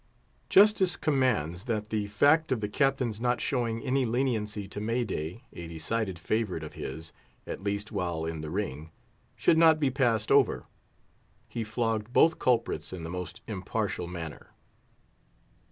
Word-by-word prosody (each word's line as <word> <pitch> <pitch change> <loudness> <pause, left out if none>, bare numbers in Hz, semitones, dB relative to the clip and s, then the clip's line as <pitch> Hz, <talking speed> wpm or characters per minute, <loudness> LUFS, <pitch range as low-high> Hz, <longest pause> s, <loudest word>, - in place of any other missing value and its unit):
Justice 195 -4 +5
commands 125 - 0
that 110 -3 -2
the 105 -2 -1
fact 145 +10 +3
of 130 - +2
the 105 - -2
Captain's 130 -2 0
not 125 0 +1
showing 115 -5 -1
any 135 +1 +1
leniency 110 -4 -1
to 100 +1 -6
May 115 +3 0
day—a 85 -2 -6
decided 90 +4 -2
favourite 95 -2 -1
of 75 - -8
his, 80 +4 -7 0.3
at - - -6
least 100 +1 -2
while 85 -6 -2
in 80 -1 -4
the 75 - -5
ring—should 80 - -2
not 160 -2 +6
be 140 -3 +2
passed 120 -5 +1
over. - - +4 0.8
He 115 - -4
flogged 110 0 -1
both 165 +5 +4
culprits 115 -10 +1
in 90 -3 -6
the 80 - -5
most 90 -1 -6
impartial 90 - -3
manner. 85 -3 -7
110 Hz, 145 wpm, -29 LUFS, 90-125 Hz, 0.8 s, not